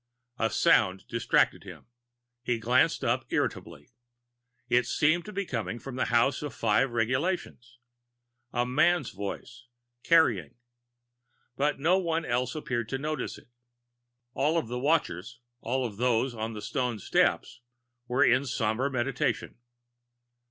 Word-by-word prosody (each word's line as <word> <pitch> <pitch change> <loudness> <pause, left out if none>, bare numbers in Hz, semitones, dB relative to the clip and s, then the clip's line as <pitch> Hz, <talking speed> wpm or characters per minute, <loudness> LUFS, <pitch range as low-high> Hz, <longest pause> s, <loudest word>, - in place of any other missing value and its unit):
A 115 - +2
sound 105 - +3
distracted 115 0 +1
him; - - -11 0.6
he 120 -1 -1
glanced 110 - +2
up - - +1
irritably. 75 +1 -3 0.8
It 120 0 +2
seemed 155 +4 +2
to 200 -2 -4
come 115 -5 -3
from 125 +2 -8
the 130 - 0
House 125 +3 +2
of 145 -4 -5
the - - -17
Five 115 +4 +2
Regulations, 125 +1 -2 0.7
a 120 0 0
man's 145 +4 +2
voice, 120 +5 -7 0.3
carrying. 120 - +3 1.0
But 145 +3 0
no 175 +6 +3
one 165 -2 -1
else 125 +2 -1
appeared 120 -6 -3
to 135 - -2
notice 150 0 -4
it. - - -18 0.8
All 150 +6 +1
of 155 -9 -2
the 125 +1 -3
watchers, 125 - 0 0.2
all 130 +2 -1
of 105 -4 -6
those 125 +1 +1
on 110 0 -4
the 105 -1 -7
stone 125 -1 -2
steps, 105 - 0 0.5
were 125 +3 +3
in 130 +2 +3
somber 115 +2 0
meditation. 130 -1 -1
125 Hz, 135 wpm, -28 LUFS, 115-140 Hz, 1.0 s, sound